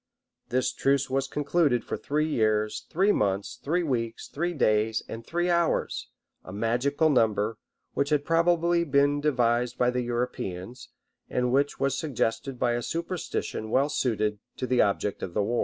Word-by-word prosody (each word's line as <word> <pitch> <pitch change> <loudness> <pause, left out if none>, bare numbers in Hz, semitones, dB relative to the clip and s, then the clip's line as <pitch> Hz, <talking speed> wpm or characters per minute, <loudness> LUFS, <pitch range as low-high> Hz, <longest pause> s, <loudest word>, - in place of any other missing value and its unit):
This 130 +1 +1
truce 135 -1 +1
was 135 0 0
concluded 145 -3 +1
for - - -3
three 150 +2 -1
years, 110 -6 0
three 195 +5 +3
months, 100 - -1
three 175 +5 0
weeks, 115 -6 -2
three 175 +4 -2
days, 110 -4 +2
and 115 +1 -7
three 175 +7 -1
hours; 170 -2 +1 0.4
a - - -10
magical 120 +9 +1
number, 110 -3 +1 0.3
which 140 0 0
had 150 -2 +1
probably 170 +1 +3
been 145 -1 +2
devised 120 -4 +1
by 125 0 +3
the 125 0 -1
Europeans, 120 -2 -4 0.4
and 125 -1 0
which 140 +2 +1
was 135 0 +1
suggested 135 -2 -2
by 120 0 +1
a 120 0 -1
superstition 165 -8 -3
well 135 +5 +2
suited 110 -6 0 0.2
to - - -2
the 125 -1 +3
object 100 0 0
of 85 - -5
the 105 - +2
war. 115 +3 0
130 Hz, 160 wpm, -27 LUFS, 115-150 Hz, 0.4 s, three